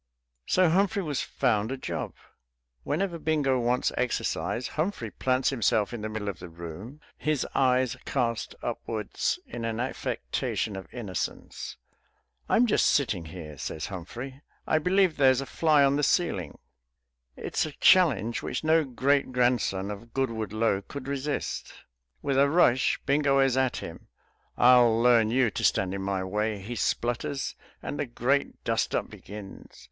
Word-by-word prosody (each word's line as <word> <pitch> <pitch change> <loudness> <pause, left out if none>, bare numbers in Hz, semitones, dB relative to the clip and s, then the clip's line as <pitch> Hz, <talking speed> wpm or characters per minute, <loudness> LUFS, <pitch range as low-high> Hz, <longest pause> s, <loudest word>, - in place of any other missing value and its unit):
So 185 -1 +4
Humphrey 195 +3 +2
was 145 -5 -2
found 110 -3 0
a 135 - -3
job. - - -4 0.7
Whenever 170 +2 -1
Bingo 145 -5 +1
wants 125 +1 +1
exercise, 125 0 -1
Humphrey 155 - -2
plants 130 +1 +1
himself 110 -4 +1
in 120 - -5
the 110 - -3
middle 110 -1 -4
of 100 - -4
the 90 - -9
room, 85 - -9 0.2
his 150 -4 0
eyes 130 -2 +2
cast 120 -4 -1
upwards 110 -2 -2
in 115 0 -7
an 115 0 -2
affectation 105 - -2
of 95 -4 -8
innocence. 105 -7 -5 0.7
"I'm 245 - +5
just 220 - +3
sitting 105 - +1
here," 80 -4 -9
says 80 - -4
Humphrey; 120 +9 -7 0.2
"I 155 - +2
believe 180 +1 +2
there's 130 -2 +5
a 135 - -3
fly 155 -1 +3
on 140 +1 +3
the - - +1
ceiling." 95 - 0 0.8
It - - -7
is - - +2
a - - -7
challenge 145 - +4
which 125 - -3
no 160 +1 +4
great 135 +1 +1
grandson 120 -6 +1
of 115 +3 -10
Goodwood 115 -6 -1
Lo 110 -2 +1
could 135 +5 -8
resist. 140 +1 -3 0.5
With 135 -1 +1
a 140 0 +5
rush 140 -6 +3
Bingo 140 0 +3
is 135 -2 +3
at 130 -1 +1
him. - - -8 0.5
"I'll 120 -2 +6
learn 115 -2 +5
you 125 -1 +2
to - - -4
stand 95 0 +2
in 100 - -3
my 95 -1 -1
way," 105 +3 -1
he 110 +6 -6
splutters. 120 +4 -1 0.3
And 145 - -4
the 145 - -1
great 130 +4 -1
dust - - 0
up - - -1
begins.... 100 -1 -10
125 Hz, 155 wpm, -27 LUFS, 110-140 Hz, 0.8 s, I'll